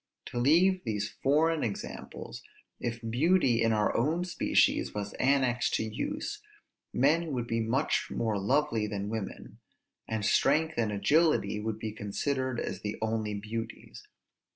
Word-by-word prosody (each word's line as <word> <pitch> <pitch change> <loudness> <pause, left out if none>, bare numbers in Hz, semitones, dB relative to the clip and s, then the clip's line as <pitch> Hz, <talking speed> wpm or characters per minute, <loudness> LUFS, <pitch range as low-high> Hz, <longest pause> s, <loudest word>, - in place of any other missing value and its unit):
To 120 - -4
leave 180 +8 +4
these 105 -2 -2
foreign 155 +4 +3
examples; 210 +4 -6 0.4
if 120 -1 -3
beauty 130 -1 +3
in 115 0 +3
our 105 -1 +1
own 160 +9 +1
species 180 - +2
was 105 0 -4
annexed 130 -2 +2
to - - 0
use, 295 - -4 0.5
men 155 +4 +2
would 120 -2 -1
be 115 -1 -1
much 120 +6 0
more 110 -3 -1
lovely 110 +1 +1
than 100 -1 -3
women; 110 -3 -6 0.5
and 110 -2 -2
strength 160 +8 +3
and 110 -3 0
agility 110 -2 +2
would 110 0 -3
be 110 -1 -4
considered 130 +5 -2
as - - -4
the 105 0 -4
only 110 -1 -1
beauties. 110 +2 -6
120 Hz, 140 wpm, -30 LUFS, 110-150 Hz, 0.5 s, leave